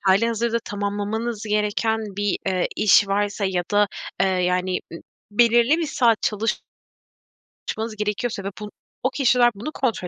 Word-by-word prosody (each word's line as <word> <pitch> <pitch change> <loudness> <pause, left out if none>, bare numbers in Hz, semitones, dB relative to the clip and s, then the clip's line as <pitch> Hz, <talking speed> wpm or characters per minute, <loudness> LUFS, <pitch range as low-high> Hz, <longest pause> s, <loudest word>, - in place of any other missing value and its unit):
hâlihazırda 230 +4 +2
tamamlamanız 205 +2 -3
gereken 210 +1 0 0.2
bir, 205 -1 0
eee, 185 -2 +1
iş 205 -1 +5
varsa 205 +1 0
ya 185 -2 0
da, 205 0 +4 0.3
eee, 195 - +4
yani, 180 0 0
ı - - -6 0.3
belirli 235 +5 +4
bir 335 - -1
saat 240 -7 +2
çalışmanız 215 +1 -2 1.2
gerekiyorsa 210 +1 -2
ve 195 - -3
bun 210 0 -7 0.3
o 260 - +3
kişiler 250 -3 +3
bunu 235 +10 -6
kontrol 235 -11 -2
210 Hz, 135 wpm, -23 LUFS, 200-235 Hz, 1.2 s, iş